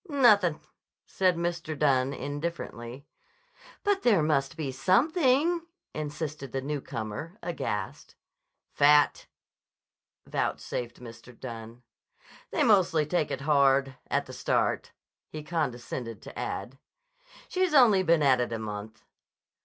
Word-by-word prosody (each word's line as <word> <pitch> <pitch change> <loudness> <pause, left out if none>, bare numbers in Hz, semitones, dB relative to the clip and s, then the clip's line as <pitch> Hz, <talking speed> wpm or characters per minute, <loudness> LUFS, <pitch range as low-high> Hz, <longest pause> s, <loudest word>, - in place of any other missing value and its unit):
"Nothin'," 210 - +4 0.5
said 185 -2 +1
Mr. 170 -2 -3
Dunne 135 -2 +2
indifferently. 140 -3 -5 0.8
"But 405 -1 +1
there 205 -10 +4
must 150 0 0
be 145 -4 -3
something," 285 - +2 0.3
insisted 150 -2 -5
the 135 - -2
newcomer 140 - -5
aghast. 105 - -4 0.6
"Fat," 145 0 +4 1.0
vouchsafed 120 -1 -3
Mr. 115 0 -12
Dunne. 115 -1 -8 0.7
"They - - +1
mostly 185 -7 +4
take 155 0 0
it 135 - -4
hard—at 135 -2 +2
the - - -10
start," - - 0 0.4
he 155 -1 -7
condescended 125 - -4
to - - -9
add. 135 +2 -5 0.7
"She's 370 -4 0
only 225 -8 +6
been 165 -3 +3
at 130 -3 +4
it 120 - -2
a 115 - -2
month." 110 0 -7
150 Hz, 110 wpm, -28 LUFS, 125-175 Hz, 1.0 s, only